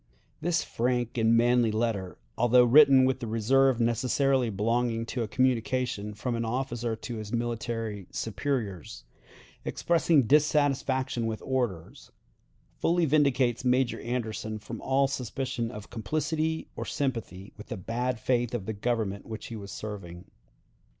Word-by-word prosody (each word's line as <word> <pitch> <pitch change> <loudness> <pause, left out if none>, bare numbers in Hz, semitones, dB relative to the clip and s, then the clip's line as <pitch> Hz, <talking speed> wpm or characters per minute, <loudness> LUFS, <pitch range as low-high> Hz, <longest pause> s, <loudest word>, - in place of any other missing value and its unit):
This 170 +1 +1
frank 120 0 -1
and 115 +1 +4
manly 120 0 +4
letter, 110 -4 -2 0.2
although 120 +1 +5
written 135 +1 +7
with 130 0 +1
the 120 - -5
reserve 125 +3 +3
necessarily 125 +2 +2
belonging 115 +3 0
to 120 +1 -3
a 115 - -1
communication 125 -2 0
from 120 +4 -3
an 115 0 -1
officer 120 -1 -2
to 110 +1 -6
his 110 -1 -7
military 115 -4 -3
superiors, 110 - -3 0.6
expressing 165 -4 +2
dissatisfaction 135 -3 +2
with 110 -1 -4
orders, 120 -11 -3 0.7
fully 170 0 +2
vindicates 135 -5 +2
Major 125 -1 +2
Anderson 110 -2 -3
from 115 +2 -8
all 135 +1 +2
suspicion 130 -1 -3
of 105 -3 -9
complicity 155 +7 -2
or - - -4
sympathy 115 - -4
with 105 - -11
the - - -5
bad 120 +5 -2
faith 120 0 0
of 105 -6 -4
the 110 - -3
Government 105 -2 -2
which 110 -1 -7
he 115 - -6
was 100 -2 -8
serving. 95 -5 -7
120 Hz, 135 wpm, -28 LUFS, 110-130 Hz, 0.7 s, written